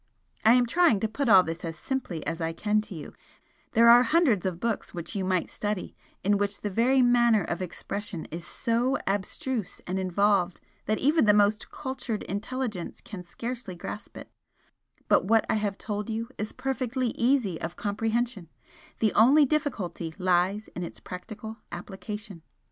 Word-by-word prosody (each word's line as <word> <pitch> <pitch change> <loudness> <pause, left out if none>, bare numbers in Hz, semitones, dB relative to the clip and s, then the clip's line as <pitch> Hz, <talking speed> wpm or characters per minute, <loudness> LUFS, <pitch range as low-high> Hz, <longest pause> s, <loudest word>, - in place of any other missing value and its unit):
I 225 - +7
am 250 0 +5
trying 330 - +4
to 220 - +1
put 245 +4 -2
all 190 -3 +8
this 165 0 -5
as 165 -1 -5
simply 190 - -4
as 165 +1 -3
I 165 0 -1
can 210 +5 +1
to 210 -3 -9
you, 155 - -8 0.6
there 230 +1 +6
are 240 +1 +9
hundreds 255 - +3
of 175 -2 -3
books 230 -3 -2
which 170 +5 -5
you 195 - -1
might 185 -2 0
study, 210 -2 -3 0.3
in 200 +1 +3
which 205 0 -1
the 205 - -3
very 250 +6 +4
manner 235 -4 +4
of 170 +3 -3
expression 185 0 -5
is 170 +2 -5
so 235 +10 0
abstruse 210 - -2
and 185 +1 -2
involved 190 0 +2 0.3
that 215 +1 +2
even 295 0 +3
the 210 -1 +6
most 210 +1 +2
cultured 260 -5 -4
intelligence 210 -1 -4
can 200 -4 -8
scarcely 230 +2 -6
grasp 205 +4 -8
it, - - -10 0.8
but - - +4
what 225 +2 +4
I - - +1
have 200 -2 -2
told 210 0 -4
you 225 +1 -3
is 215 +1 -4
perfectly 255 -1 -2
easy 235 -7 +1
of 170 +2 -4
comprehension, 220 -2 -2 0.5
the 220 -2 +3
only 275 +7 +6
difficulty 200 - -2
lies 185 +3 +1
in 180 - -7
its 170 - -6
practical 215 +4 -8
application. 195 +1 -7
210 Hz, 170 wpm, -27 LUFS, 185-240 Hz, 0.8 s, are